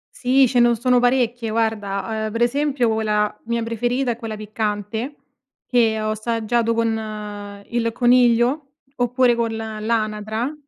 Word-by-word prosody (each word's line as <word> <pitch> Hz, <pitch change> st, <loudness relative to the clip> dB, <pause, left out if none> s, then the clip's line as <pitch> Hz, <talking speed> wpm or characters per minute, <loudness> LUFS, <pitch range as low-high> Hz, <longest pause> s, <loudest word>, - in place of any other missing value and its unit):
Sì, 265 Hz, +2 st, +3 dB
c'è 245 Hz, 0 st, +1 dB
ne 240 Hz, 0 st, +5 dB
sono 250 Hz, +2 st, +2 dB
parecchie 245 Hz, -2 st, +1 dB
guarda, 220 Hz, -1 st, -1 dB
uhm, 215 Hz, -, -5 dB
pre 230 Hz, +1 st, +1 dB
esempio 265 Hz, -2 st, +1 dB
quella 210 Hz, -1 st, 0 dB
mia 235 Hz, 0 st, -1 dB
preferita 240 Hz, +3 st, -1 dB
è 230 Hz, -, -4 dB
quella 225 Hz, -2 st, -5 dB
piccante 215 Hz, +4 st, -3 dB, 0.5 s
che 225 Hz, -3 st, +2 dB
ho 215 Hz, 0 st, -1 dB
assaggiato 230 Hz, +1 st, 0 dB
con 210 Hz, -3 st, -4 dB
il 235 Hz, -1 st, 0 dB
coniglio 245 Hz, +3 st, +3 dB, 0.3 s
oppure 245 Hz, 0 st, +3 dB
col 230 Hz, -1 st, -1 dB
l'anatra. 220 Hz, +2 st, -2 dB
230 Hz, 135 wpm, -21 LUFS, 215-245 Hz, 0.5 s, ne